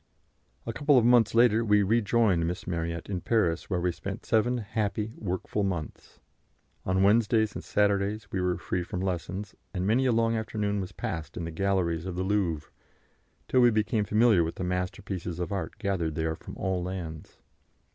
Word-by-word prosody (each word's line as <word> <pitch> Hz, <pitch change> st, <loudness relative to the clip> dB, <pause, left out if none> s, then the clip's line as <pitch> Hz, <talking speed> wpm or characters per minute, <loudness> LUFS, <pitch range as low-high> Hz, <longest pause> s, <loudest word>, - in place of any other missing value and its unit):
A 115 Hz, -, -3 dB
couple 145 Hz, +2 st, +3 dB
of 120 Hz, -, +4 dB
months 120 Hz, -2 st, +5 dB
later 115 Hz, -1 st, +5 dB
we 105 Hz, -2 st, +4 dB
rejoined 105 Hz, -4 st, +2 dB
Miss 90 Hz, +1 st, -4 dB
Marryat 85 Hz, -1 st, -3 dB
in 95 Hz, -3 st, -3 dB
Paris, 90 Hz, -8 st, +1 dB
where 90 Hz, -3 st, 0 dB
we 90 Hz, 0 st, +1 dB
spent -, -, -7 dB
seven 120 Hz, +3 st, +2 dB
happy, 110 Hz, 0 st, -2 dB
workful 95 Hz, +1 st, -2 dB
months. 90 Hz, -6 st, -4 dB, 0.7 s
On 95 Hz, +1 st, +2 dB
Wednesdays 110 Hz, +1 st, +3 dB
and -, -, -6 dB
Saturdays 100 Hz, +1 st, +1 dB
we 95 Hz, -, -1 dB
were 90 Hz, -1 st, 0 dB
free 90 Hz, +1 st, -2 dB
from 90 Hz, +1 st, -4 dB
lessons, 95 Hz, +2 st, -3 dB, 0.2 s
and 90 Hz, 0 st, -1 dB
many 120 Hz, +6 st, +3 dB
a -, -, +3 dB
long 115 Hz, 0 st, +2 dB
afternoon 105 Hz, -2 st, -1 dB
was 95 Hz, +1 st, -6 dB
passed 80 Hz, -3 st, -5 dB
in 85 Hz, -, -3 dB
the 85 Hz, -, -5 dB
galleries 90 Hz, -1 st, 0 dB
of 90 Hz, -, -4 dB
the 90 Hz, -, -1 dB
Louvre, 95 Hz, -7 st, -1 dB, 0.8 s
till 130 Hz, -, +3 dB
we 120 Hz, -, +7 dB
became 110 Hz, 0 st, +1 dB
familiar 105 Hz, -3 st, +4 dB
with 80 Hz, -, -3 dB
the -, -, -4 dB
masterpieces 90 Hz, -1 st, -3 dB
of 90 Hz, -, -3 dB
art 100 Hz, -2 st, -4 dB
gathered 95 Hz, -8 st, -1 dB
there 80 Hz, 0 st, -1 dB
from -, -, -11 dB
all 95 Hz, -1 st, -1 dB
lands. 85 Hz, -4 st, -6 dB
100 Hz, 180 wpm, -28 LUFS, 90-110 Hz, 0.8 s, we